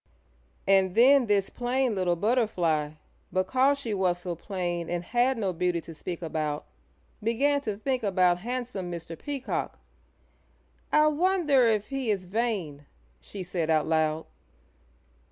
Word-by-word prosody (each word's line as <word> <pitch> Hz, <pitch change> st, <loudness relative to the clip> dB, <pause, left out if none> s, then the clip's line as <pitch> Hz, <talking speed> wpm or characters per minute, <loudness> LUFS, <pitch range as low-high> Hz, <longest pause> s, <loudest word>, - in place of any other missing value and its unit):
And 190 Hz, -2 st, +4 dB
then 255 Hz, +2 st, +6 dB
this 200 Hz, -2 st, +1 dB
plain 250 Hz, 0 st, 0 dB
little 185 Hz, -3 st, +1 dB
Butterfly, 175 Hz, -8 st, +1 dB, 0.4 s
because 255 Hz, +10 st, +2 dB
she 235 Hz, -6 st, -4 dB
was 185 Hz, -3 st, +1 dB
so 175 Hz, 0 st, -5 dB
plain 175 Hz, -1 st, -4 dB
and 175 Hz, 0 st, -2 dB
had 245 Hz, +6 st, +1 dB
no 195 Hz, -4 st, -1 dB
beauty 175 Hz, 0 st, 0 dB
to 165 Hz, -, -10 dB
speak 175 Hz, +2 st, -6 dB
about, 155 Hz, -2 st, -2 dB, 0.6 s
began 275 Hz, +6 st, +1 dB
to 215 Hz, -6 st, -3 dB
think 255 Hz, +3 st, -1 dB
about 185 Hz, -4 st, +2 dB
handsome 235 Hz, -4 st, -4 dB
Mr. 165 Hz, -1 st, -6 dB
Peacock. 280 Hz, -, -4 dB, 1.1 s
"I 305 Hz, 0 st, +5 dB
wonder 305 Hz, -5 st, +3 dB
if 215 Hz, -2 st, 0 dB
he 270 Hz, -4 st, -2 dB
is 195 Hz, -3 st, 0 dB
vain?" 180 Hz, -9 st, -2 dB, 0.3 s
she 190 Hz, -, -8 dB
said 170 Hz, -2 st, -2 dB
out 155 Hz, -1 st, +3 dB
loud. 160 Hz, 0 st, +1 dB
195 Hz, 135 wpm, -27 LUFS, 175-245 Hz, 1.1 s, then